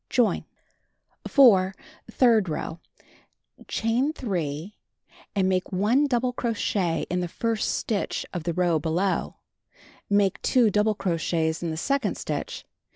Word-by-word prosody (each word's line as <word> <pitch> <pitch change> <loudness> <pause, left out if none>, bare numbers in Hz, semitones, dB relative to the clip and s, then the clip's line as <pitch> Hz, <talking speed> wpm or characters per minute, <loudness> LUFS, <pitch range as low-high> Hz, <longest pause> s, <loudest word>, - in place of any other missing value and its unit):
Join. 245 -3 +1 0.8
4. 195 -9 +5 0.3
Third 225 -7 +3
row: 160 +1 -4 0.9
Chain 240 +7 0
3, 175 - -4 0.6
and 190 -2 +2
make 185 0 0
1 220 +10 +2
double 250 -1 0
cro 235 -2 -2
chet 175 -6 0
in 180 - 0
the 175 - -2
first 225 +5 -1
stitch 210 -3 -2
of 175 - -3
the 170 +1 -2
row 175 -3 +2
below. 170 +5 -1 0.7
Make 200 -2 +2
2 240 -5 +3
double 210 +1 +2
crochets 165 -3 -1
in 170 - -2
the 160 - -4
second 270 +4 0
stitch. - - -4
195 Hz, 130 wpm, -25 LUFS, 175-230 Hz, 0.9 s, 4